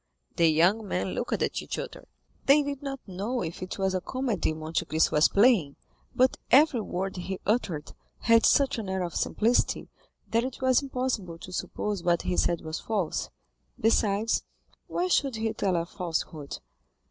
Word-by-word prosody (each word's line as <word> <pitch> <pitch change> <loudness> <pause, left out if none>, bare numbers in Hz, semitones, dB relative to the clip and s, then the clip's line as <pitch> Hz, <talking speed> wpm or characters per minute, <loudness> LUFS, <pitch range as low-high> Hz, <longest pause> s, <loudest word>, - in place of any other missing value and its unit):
The 170 - +4
young 185 +8 +3
men 180 0 -1
looked 240 - -3
at - - -1
each - - -5
other; - - -7 0.4
they 290 +2 +6
did 280 -1 -4
not 275 -1 -4
know 205 +7 -3
if 165 - -6
it 185 - -5
was 190 -1 0
a 185 - -1
comedy 255 -10 -1
Monte 155 +2 -2
Cristo 160 -1 +2
was 150 - +5
playing, 200 - +4 0.4
but 255 +1 +3
every 270 -2 +5
word 190 -1 -3
he 190 +1 -4
uttered 185 -9 -1 0.3
had 230 -1 +5
such 275 -3 +4
an 205 -4 -5
air 190 -1 -1
of 175 - -4
simplicity, 230 +3 +1 0.4
that 230 +1 +2
it 260 0 -5
was 260 0 +3
impossible 250 -10 -3
to 180 +2 -10
suppose 205 +2 -3
what 170 -1 +1
he 180 - -1
said 170 -1 +1
was 160 0 -5
false—besides, 215 +2 -1 0.5
why 360 - -1
should 275 -8 +2
he 220 0 -1
tell 190 -2 0
a 170 0 0
falsehood? 165 -5 -4
200 Hz, 170 wpm, -27 LUFS, 175-250 Hz, 0.5 s, they